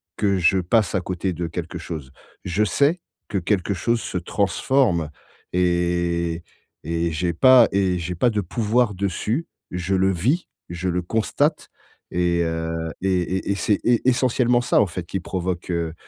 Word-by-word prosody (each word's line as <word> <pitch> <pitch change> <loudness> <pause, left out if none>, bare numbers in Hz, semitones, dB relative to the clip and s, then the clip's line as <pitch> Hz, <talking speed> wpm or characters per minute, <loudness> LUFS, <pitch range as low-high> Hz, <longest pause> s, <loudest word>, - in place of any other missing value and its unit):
que 100 -2 +1
je 90 +2 +4
passe 95 +4 +1
à 95 - +1
côté 90 +1 -2
de 85 +1 -3
quelque 85 +1 -5
chose. 80 -5 -7 0.3
Je 90 +4 +1
sais 145 - +2 0.3
que 105 - -1
quelque 95 +1 0
chose 115 +7 0
se - - -4
transforme 95 - +1 0.4
et 85 -1 +1 0.5
et 85 +2 -1
et - - -2
j'ai 85 +2 -1
pas 125 +7 +7
et 95 -2 +2
j'ai 85 +1 -4
pas 120 +9 +3
de 105 -2 -1
pouvoir 110 +4 +1
dessus. 100 - -1 0.3
Je 90 +1 -2
le 95 +1 +3
vis. 125 - 0 0.2
Je 85 +1 -4
le 90 0 0
constate 115 - 0 0.4
et 85 -1 +1
heu, 80 0 -2 0.3
et 95 -1 +1
et 95 +3 -2
et - - +1
c'est 100 0 +1
et 120 - +4
c'est - - -18
essentiellement 125 -1 +3
ça, - - +2
en 105 - +2
fait, 90 0 -6
qui 95 +3 -3
provoque, 90 0 -4
heu 85 -2 -2
90 Hz, 175 wpm, -23 LUFS, 85-110 Hz, 0.5 s, pas